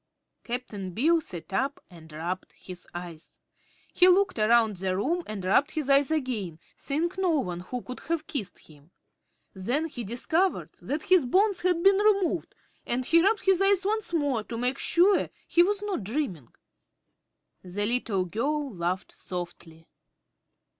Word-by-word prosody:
Cap'n 210 -7 -5
Bill 325 +7 +3
sat 180 - -8
up 275 +7 -1
and 160 -2 -14
rubbed 170 +4 -5
his 180 -1 -11
eyes. 175 -2 -9 0.5
He 360 - +6
looked 370 - +3
around 220 -1 +3
the 185 0 -1
room 325 - 0
and 205 -3 -5
rubbed 245 +10 +3
his 300 -3 -2
eyes 275 +1 +5
again, 240 - -2 0.2
seeing 315 +5 -2
no 355 -4 +2
one 180 -7 -3
who 245 +7 -6
could 250 - -8
have 330 0 -1
kissed 250 - -4
him. 150 0 -19 0.6
Then 245 +12 -1
he 275 -7 -6
discovered 320 - 0
that 300 +2 -3
his 370 -6 +4
bonds 390 - +2
had 355 -2 +1
been 390 0 +6
removed 395 -5 +1 0.3
and 250 +1 -1
he 335 +5 +5
rubbed 410 +4 +1
his 385 -1 +4
eyes 390 -1 +3
once 435 -1 +1
more 285 -9 0
to 230 - -6
make 250 +3 0
sure 375 +4 +3 0.2
he 345 - +4
was 405 +3 +1
not 395 - -3
dreaming. 195 - -3 1.1
The 190 +3 -3
little 215 -5 0
girl 275 - -2
laughed 180 +1 -3
softly. 170 -2 -8
255 Hz, 155 wpm, -27 LUFS, -, 1.1 s, He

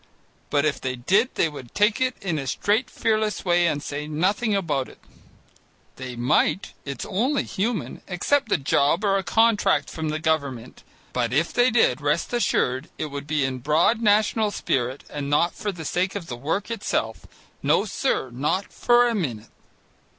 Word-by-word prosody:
but 145 0 +2
if 150 - 0
they 130 -1 -2
did 195 - +2
they - - +2
would 140 -6 -10
take 210 +3 +2
it 255 0 +1
in 170 -6 -1
a 135 - -5
straight 215 - 0
fearless 215 -2 -1
way 175 -1 +3
and 145 -3 -1
say 150 +1 -5
nothing 200 +8 0
about 150 -9 -1
it. - - -16 1.0
They 130 -1 -6
might, 125 - +1
it's 140 -3 -5
only 250 +9 0
human, 215 +3 -3
accept 220 +6 0
a - - +4
job 140 +6 +2
or 195 -1 +3
a - - -4
contract 220 -11 +2
from 160 -1 -3
the 155 - -1
government, 150 -7 -2 0.3
but 120 -2 0
if 155 +6 +1
they 245 +1 +4
did, 220 - +2
rest 150 +9 0
assured 130 - 0
it 155 -2 -4
would 140 0 -6
be 150 -3 +1
in 130 -1 -2
a - - -9
broad 155 - +2
national 215 0 +3
spirit 130 -8 -2
and 145 -1 -5
not 165 +4 +2
for 205 - -3
the 165 -4 -8
sake 185 +4 -1
of 200 -4 -4
the 125 - -6
work 160 - -2
itself. 115 - -2 0.3
No, - - +2
sir. 130 - -1
Not 150 +10 -2
for 240 0 +4
a 235 - 0
minute. 120 - -3
165 Hz, 180 wpm, -24 LUFS, 140-210 Hz, 1.0 s, a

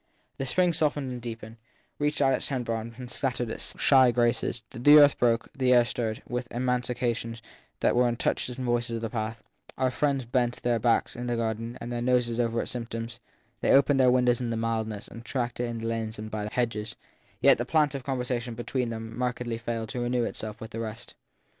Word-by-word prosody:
The 135 - -2
spring 180 +4 +3
softened 145 -4 0
and 125 -1 -6
deepened, 115 -1 -7 0.4
reached 145 0 +1
out 135 0 +4
its - - -1
tender 125 -4 -2
arms 115 +1 -5
and 125 -1 -8
scattered 125 -4 -1
its - - -3
shy 130 -2 +6
graces; 120 -1 +1
the 145 +5 +7
earth 145 -1 +7
broke, 115 -1 +2
the 130 -2 +1
air 120 -1 +6
stirred, 115 -3 -3
with 125 0 -3
emanations 120 -2 -1 0.4
that - - +3
were 125 0 +4
as 120 -1 -1
touches 125 +1 -1
and 130 - -4
voices 120 -1 0
of 115 - -4
the 110 - -3
past; 115 -1 -4 0.3
our 130 -1 +1
friends 135 0 0
bent 120 0 0
their 120 -1 +2
backs 115 +1 +2
in 120 +1 -5
their 120 -1 0
garden 115 +1 -3
and 120 - -6
their 120 0 -2
noses 120 -1 +1
over 115 -1 +1
its - - -5
symptoms; 115 0 -5 0.4
they - - 0
opened 140 0 +5
their 130 -1 +6
windows 125 -1 +3
to 120 -2 -2
the 115 - -1
mildness 110 -2 -2
and 115 - -10
tracked 120 -1 -3
it 120 - 0
in 120 -1 -4
the 115 - -5
lanes 115 -1 -3
and 110 +1 -7
by 105 -1 -3
the - - -4
hedges; 115 -3 -1 0.4
yet - - +5
the - - +1
plant 150 +1 +2
of 135 -2 -5
conversation 125 -2 -2
between 120 +1 -2
them 115 0 -6
markedly 125 -2 -2
failed 115 -2 -3
to 125 - -3
renew 120 0 +1
itself 110 -1 -4
with 110 -1 -8
the 115 - -5
rest. 115 +1 -6
120 Hz, 215 wpm, -27 LUFS, 115-125 Hz, 0.4 s, the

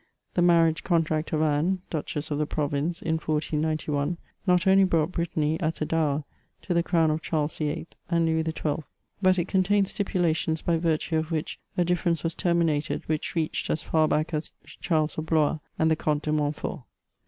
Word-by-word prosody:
The 175 - +1
marriage 165 -2 +4
contract 160 -3 +1
of 155 0 +1
Anne, 160 +5 +1
Duchess 155 -1 -3
of 145 - 0
the 150 - 0
province 150 +3 -1
in 160 0 +1
1491, 155 0 -1 0.3
not 180 -1 +4
only 195 0 +6
brought 165 -3 +2
Brittany, 160 -3 -1
as 160 0 -1
a 155 - 0
dower, 150 -2 0 0.4
to 180 - -1
the 170 - +3
crown 165 -2 +2
of 155 +1 -1
Charles 155 -1 -2
VIII. 155 +1 -2 0.2
and 170 -1 +2
Louis 160 0 +2
XII., 160 -2 -2 0.4
but 185 -1 +4
it 175 0 0
contained 195 +1 +2
stipulations 165 -5 0
by 170 -1 +2
virtue 160 0 0
of 160 0 -1
which 160 -2 -3 0.2
a 175 - +3
difference 170 -2 0
was 165 0 -1
terminated, 165 -4 0
which 155 +1 -2
reached 160 -2 -1
as 155 - 0
far 155 -1 +2
bock 155 +2 0
as 155 +1 -2
Charles 155 -2 -1
of 155 - -5
Blois 155 -1 +2 0.2
and 160 0 +3
the - - +4
Comte 150 -1 -1
de 155 - -1
Montfort. 150 -1 -1
160 Hz, 185 wpm, -26 LUFS, 155-170 Hz, 0.4 s, only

